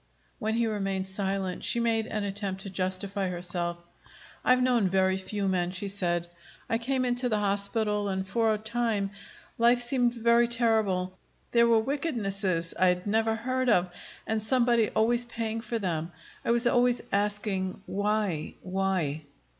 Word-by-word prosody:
When 220 +1 -1
he 235 0 +2
remained 195 -3 -1
silent, 190 -1 -2
she 235 - +2
made 225 -1 +1
an 215 -3 -2
attempt 200 -1 -3
to 195 - -7
justify 190 +1 -2
herself. 175 -1 -2 0.7
"I'd 255 0 +4
known 240 -6 +3
very 190 0 +2
few 195 +1 -3
men," 180 -2 +1
she 185 +2 -4
said. 175 -3 -1 0.4
"I 225 - 0
came 255 +2 0
into 245 0 +1
the 215 - +1
hospital, 205 +1 0
and 190 0 -2
for 225 +3 +2
a 215 - +1
time 220 -2 -1 0.5
life 240 +1 +5
seemed 245 0 +1
very 235 0 +4
terrible. 215 -6 +1 0.3
There 235 0 +5
were 230 -1 +5
wickednesses 200 - -1
I 185 - +5
had 180 0 +1
never 220 +2 +1
heard 255 +2 -1
of, 180 -4 +3 0.3
and 220 0 -1
somebody 235 -1 +3
always 240 +2 +2
paying 225 -1 -3
for 235 0 -3
them. 170 -5 -2 0.3
I - - -3
was 235 +1 +3
always 245 0 +3
asking, 200 -2 -1
Why? 205 -5 -1
Why? 185 -5 -1
210 Hz, 155 wpm, -28 LUFS, 190-235 Hz, 0.7 s, life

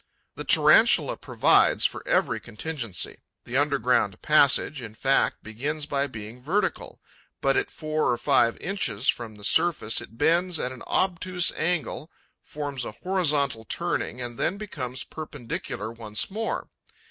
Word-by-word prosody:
The - - -6
Tarantula - - +5
provides - - +3
for - - 0
every - - +1
contingency: 115 - -4 0.2
the 120 - -7
underground 130 -8 +1
passage, 145 -2 +4
in 110 -2 -9
fact, 135 +4 +1
begins 140 +8 -4
by 140 -1 0
being 115 -1 -9
vertical, 180 +11 -2 0.4
but, - - +2
at 400 0 0
four 155 0 -1
or 120 - +1
five 115 0 +3
inches 135 - -1
from 115 -3 -1
the 105 - -13
surface, 150 -3 +1
it 115 - -13
bends 170 +4 +2
at 125 - -2
an 130 - -10
obtuse 180 -1 +1
angle, 160 -1 -2 0.3
forms 145 -3 -5
a 110 - -6
horizontal 145 - 0
turning 120 - -2
and 120 -1 -6
then 195 - 0
becomes 130 - -5
perpendicular 120 -7 -6
once 110 - -3
more. 225 +3 -3
140 Hz, 140 wpm, -26 LUFS, 115-160 Hz, 0.4 s, Tarantula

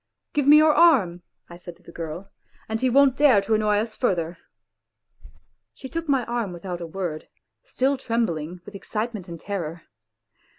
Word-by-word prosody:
" - - -59
.Give 290 -3 0
me 295 +1 +9
your 310 0 +5
arm," 210 - +4 0.3
I 170 - -11
said 175 -1 -11
to - - -27
the - - -13
girl. 170 +4 -7 0.2
" - - -32
And 220 0 -3
he 260 - +2
won't 270 +1 +4
dare 275 -7 +5
to 200 +3 -1
annoy 215 -1 +2
us 215 +1 -2
further." 175 -8 -1 1.4
She 265 - -9
took 330 +1 -5
my 265 -4 +2
arm 235 -6 -3
without 175 0 -6
a 170 - -5
word, 165 -3 -5 0.4
still 275 - 0
trembling 180 - -2
with - - -11
excite 215 +4 -4
ment 195 -4 -8
and 170 -1 -8
terror. 170 -5 -5
210 Hz, 185 wpm, -24 LUFS, 175-255 Hz, 1.4 s, me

